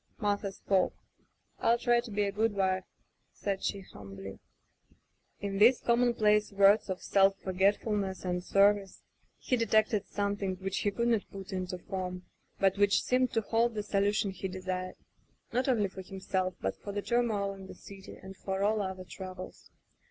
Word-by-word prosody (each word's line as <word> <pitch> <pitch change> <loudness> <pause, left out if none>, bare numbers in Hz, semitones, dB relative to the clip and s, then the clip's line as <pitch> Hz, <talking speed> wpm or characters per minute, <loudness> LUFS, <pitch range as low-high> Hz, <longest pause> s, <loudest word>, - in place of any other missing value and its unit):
Martha 205 -2 0
spoke: 190 -1 0 0.7
"FU 235 - +4
try 240 0 +3
to 235 0 -6
be 205 0 0
a 200 - 0
good 215 +1 0
wife,'* 190 -1 +1 0.5
said 195 -1 -3
she 200 - -1
hum 100 - -12
bly. 95 0 -8 1.0
In 195 -1 -3
these 240 +4 +6
commonplace 230 -3 +3
words 200 +1 +5
of 185 -1 -4
self 195 0 +4
for 190 - -4
getfulness 195 0 +1
and 180 0 -1
service 200 0 +2 0.3
he 255 - 0
detected 220 -3 +2
something 200 -2 -2
which 190 +1 -3
he 205 - +1
could 235 +4 0
not 225 -4 +1
put 195 -1 -8
into 185 -1 -3
form, 180 0 -5 0.4
but 195 0 +2
which 200 0 +4
seemed 255 0 +2
to 225 - +2
hold 230 +2 +1
the 210 - -2
solution 205 0 +1
he 190 0 -5
desired, 185 0 -4 0.6
not 250 +3 +1
only 220 -6 +2
for 190 0 -9
himself, 185 -1 -2
but - - -2
for 200 - -6
the 205 0 -3
turmoil 220 -5 0
in 195 -1 -11
the - - -10
city 195 +1 -12
and 190 0 -11
for 190 +1 -3
all 210 +1 +2
other 190 -1 -4
troubles. 185 0 -9
200 Hz, 175 wpm, -30 LUFS, 190-210 Hz, 1.0 s, these